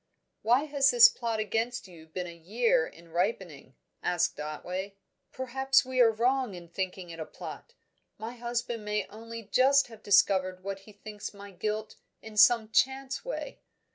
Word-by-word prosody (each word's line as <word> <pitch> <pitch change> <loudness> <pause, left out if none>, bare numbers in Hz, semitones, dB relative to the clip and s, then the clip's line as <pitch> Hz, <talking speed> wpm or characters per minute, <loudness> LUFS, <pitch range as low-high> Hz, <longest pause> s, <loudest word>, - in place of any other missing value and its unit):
"Why 245 +5 +3
has 280 -2 +3
this 470 -1 +9
plot 230 - -3
against 225 +2 -2
you 165 -3 -14
been 180 +3 -5
a 170 - -8
year 190 +1 +1
in 170 0 -16
ripening?" 175 - -2 0.3
asked 175 -1 0
Otway. 180 +6 -5 0.4
"Perhaps 265 +1 +2
we 260 0 -2
are 230 - +7
wrong 245 -1 0
in 175 -1 -11
thinking 185 0 -4
it 165 - -9
a 160 - -4
plot. 485 - -10 0.4
My 225 +2 -6
husband 235 -1 -3
may 210 0 -1
only 230 +1 -9
just 265 +5 +4
have 225 -2 -13
discovered 190 -2 +3
what 195 0 -4
he - - -11
thinks 205 0 -8
my 200 0 -10
guilt 215 +3 -4 0.2
in 220 -1 -11
some 220 +1 +5
chance 265 - +1
way. - - -5
215 Hz, 165 wpm, -29 LUFS, 185-245 Hz, 0.4 s, this